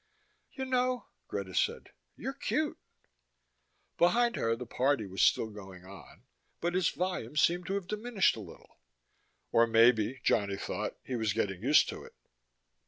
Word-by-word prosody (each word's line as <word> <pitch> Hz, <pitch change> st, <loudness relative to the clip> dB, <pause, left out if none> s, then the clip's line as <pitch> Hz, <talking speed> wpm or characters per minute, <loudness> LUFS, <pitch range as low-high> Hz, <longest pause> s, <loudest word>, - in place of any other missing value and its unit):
"You 265 Hz, -, -4 dB
know," 255 Hz, -1 st, 0 dB, 0.2 s
Greta 95 Hz, -2 st, -5 dB
said, -, -, -1 dB, 0.2 s
"you're -, -, -5 dB
cute." -, -, -2 dB, 1.2 s
Behind 235 Hz, +8 st, +3 dB
her 115 Hz, 0 st, 0 dB
the 125 Hz, +2 st, -7 dB
party 130 Hz, 0 st, +1 dB
was 95 Hz, 0 st, -3 dB
still 110 Hz, -, +3 dB
going 95 Hz, -3 st, -11 dB
on, 95 Hz, 0 st, -13 dB, 0.4 s
but 175 Hz, +1 st, -1 dB
its 185 Hz, -2 st, +3 dB
volume 180 Hz, -9 st, -3 dB
seemed 175 Hz, +3 st, +2 dB
to 195 Hz, -, -1 dB
have 200 Hz, -3 st, -3 dB
diminished 215 Hz, 0 st, +1 dB
a -, -, -8 dB
little. 105 Hz, -, -13 dB, 0.7 s
Or 115 Hz, 0 st, +5 dB
maybe, 115 Hz, +2 st, +4 dB
Johnny 100 Hz, -1 st, +1 dB
thought, -, -, -4 dB
he 130 Hz, -, -4 dB
was 110 Hz, -3 st, 0 dB
getting 95 Hz, -4 st, -2 dB
used 140 Hz, +6 st, +5 dB
to -, -, -6 dB
it. -, -, -15 dB
125 Hz, 155 wpm, -31 LUFS, -, 1.2 s, Or